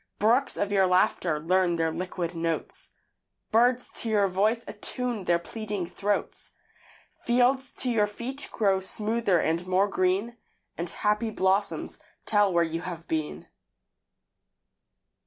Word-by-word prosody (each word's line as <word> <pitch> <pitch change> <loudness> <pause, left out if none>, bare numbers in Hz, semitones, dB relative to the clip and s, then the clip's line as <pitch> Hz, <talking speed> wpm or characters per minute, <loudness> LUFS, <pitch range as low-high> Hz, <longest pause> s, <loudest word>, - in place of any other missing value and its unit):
Brooks 235 +6 +2
of 205 - -1
your 195 -2 +4
laughter 180 -3 +2
learn 180 +2 +2
their 165 -1 0
liquid 175 0 -4
notes. 165 -1 -3 0.6
Birds 245 +2 +3
to 230 - -4
your 205 -2 +3
voice 210 +5 +1
attune 230 0 -1
their 170 -1 +3
pleading 205 +1 -4
throats. 200 +4 -3 0.7
Fields 250 +2 +2
to 255 - -2
your 210 -3 +3
feet 250 +7 -7
grow 195 -4 +2
smoother 210 0 0
and 165 +3 -1
more 185 +2 +3
green; 195 +5 0 0.4
And 170 +1 -4
happy 210 +4 0
blossoms 195 0 0 0.3
tell 205 -2 +3
where 170 -1 +3
you 165 0 -3
have 175 -1 -6
been. 155 -2 -3
195 Hz, 130 wpm, -27 LUFS, 175-225 Hz, 0.7 s, your